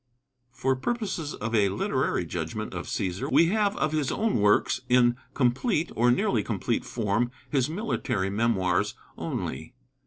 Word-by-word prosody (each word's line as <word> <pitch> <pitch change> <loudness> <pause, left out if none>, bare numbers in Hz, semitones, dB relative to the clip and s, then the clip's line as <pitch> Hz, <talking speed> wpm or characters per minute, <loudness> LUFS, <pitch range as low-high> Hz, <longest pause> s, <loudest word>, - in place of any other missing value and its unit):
For 130 +1 0
purposes 190 - -3
of 115 +1 -4
a 105 -3 +4
literary 100 - 0
judgment - - -4
of - - -5
Cæsar 95 - -2
we 165 - +5
have 210 0 +1
of 155 - 0
his 155 -3 0
own 220 - +1
works 105 +5 +3
in 120 -1 +5 0.2
complete 145 - +1
or 120 +2 +3
nearly 120 - +2
complete - - -1
form 115 +1 0 0.2
his 135 -2 +2
military 155 - -1
memoirs 100 -5 +1 0.2
only. 80 - -5
125 Hz, 145 wpm, -27 LUFS, 105-155 Hz, 0.2 s, we